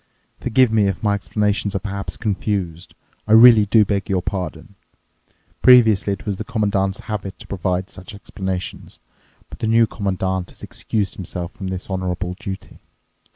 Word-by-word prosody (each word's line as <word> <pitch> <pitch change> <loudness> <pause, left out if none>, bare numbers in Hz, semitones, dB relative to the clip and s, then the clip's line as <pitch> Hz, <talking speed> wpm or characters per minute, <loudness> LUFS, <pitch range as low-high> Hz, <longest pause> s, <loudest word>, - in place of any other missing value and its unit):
"Forgive 130 0 +3
me 110 -2 +3
if 95 +1 -3
my 105 -1 +2
explanations 100 0 -1
are - - +1
perhaps 100 0 -5
confused. 95 -5 -3 0.3
I 110 - +3
really 110 -2 +8
do 110 0 +5
beg 100 -1 -2
your 95 -2 0
pardon. 90 -1 -5 0.9
Previously 115 -6 +6
it 100 - -8
was 100 -3 -2
the 110 - -4
Commandant's 100 -4 -1
habit 105 -3 -5
to - - -12
provide 95 0 -2
such 90 +3 -9
explanations. 95 -2 -5 0.5
But - - -10
the 110 - -1
New 115 +1 +5
Commandant 95 -3 -2
has - - -14
excused 100 -4 -3
himself 90 -2 -5
from 95 - -7
this 95 0 -5
honourable 90 -1 -3
duty. 95 -2 -7
100 Hz, 155 wpm, -21 LUFS, 95-105 Hz, 0.9 s, really